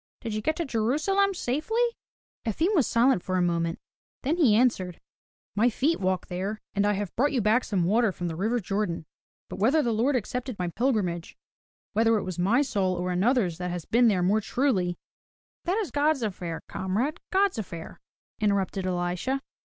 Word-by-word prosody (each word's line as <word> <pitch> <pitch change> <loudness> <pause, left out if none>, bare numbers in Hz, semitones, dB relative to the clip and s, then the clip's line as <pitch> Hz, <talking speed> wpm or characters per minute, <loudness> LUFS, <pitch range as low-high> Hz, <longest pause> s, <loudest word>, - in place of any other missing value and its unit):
Did 225 -2 -4
you 215 - -2
get 315 +8 0
to 340 - -2
Jerusalem 310 - +1
safely?" 330 - 0 0.6
Efim 320 - 0
was 300 - +3
silent 235 -3 +3
for 185 +1 -1
a - - +2
moment, 170 -1 0 0.5
then 305 +6 +1
he 260 -12 +5
answered: 200 -7 +1 0.6
"My 225 +4 +4
feet 285 +8 +1
walked 185 -1 -1
there, 195 +4 -3
and 205 0 +2
I 210 - +3
have 200 -2 -4
brought 285 +5 +2
you 260 - +2
back 220 +3 +3
some 195 -5 0
water 215 +4 +3
from 175 -1 -4
the 165 - -3
river 220 +8 0
Jordan. 195 -5 -2 0.4
But - - -8
whether 275 +9 +3
the 235 - +1
Lord 245 +6 +2
accepted 250 0 -3
my 180 -1 -2
pilgrimage, 185 -6 -1 0.3
— - - -82
whether 225 +1 +3
it - - -2
was 185 -2 -5
my 225 +10 +3
soul 195 -8 0
or 180 +1 -2
another's 185 -2 +1
that 180 0 -2
has 175 -2 -4
been 240 +1 +4
there 190 -5 +2
more 205 +4 +3
truly, 200 -7 0 0.2
— - - -
" - - -54
"That 360 +4 +1
is 430 -6 -2
God's 290 -2 +2
affair, 180 -5 -4
comrade, 220 - -2
God's 390 - +2
affair," 170 -5 -7 0.4
interrupted 195 -2 0
Elisha. 180 +9 -1
215 Hz, 190 wpm, -27 LUFS, 185-260 Hz, 0.6 s, he